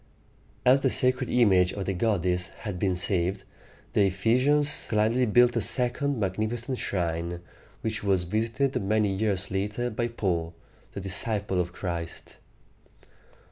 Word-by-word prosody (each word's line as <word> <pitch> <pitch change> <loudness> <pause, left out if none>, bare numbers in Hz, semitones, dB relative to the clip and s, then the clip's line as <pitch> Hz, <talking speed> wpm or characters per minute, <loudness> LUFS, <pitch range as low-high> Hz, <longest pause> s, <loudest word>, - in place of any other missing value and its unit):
As 130 +2 +5
the 135 - +2
sacred 130 0 +1
image 95 -7 +3
of 100 - -4
the 95 - -1
goddess 90 -3 0
had 95 +1 -7
been 95 -1 0
saved, 95 +1 0 0.5
the - - +3
E - - +3
phe´sians 130 +10 +1
gladly 115 +3 +2
built 120 +3 +4
a 115 - +1
second 125 +5 +1
magnificent 110 +6 -2
shrine, 85 -1 -2 0.4
which 110 -1 -3
was 95 -3 +1
visited 115 +8 -1
many 105 +1 +1
years 95 -2 -1
later 105 +5 -2
by 120 +2 -2
Paul, 85 -8 -2 0.4
the 100 - -6
disciple 100 0 +2
of 90 0 -5
Christ. 85 -2 -6
105 Hz, 140 wpm, -26 LUFS, 95-120 Hz, 0.5 s, As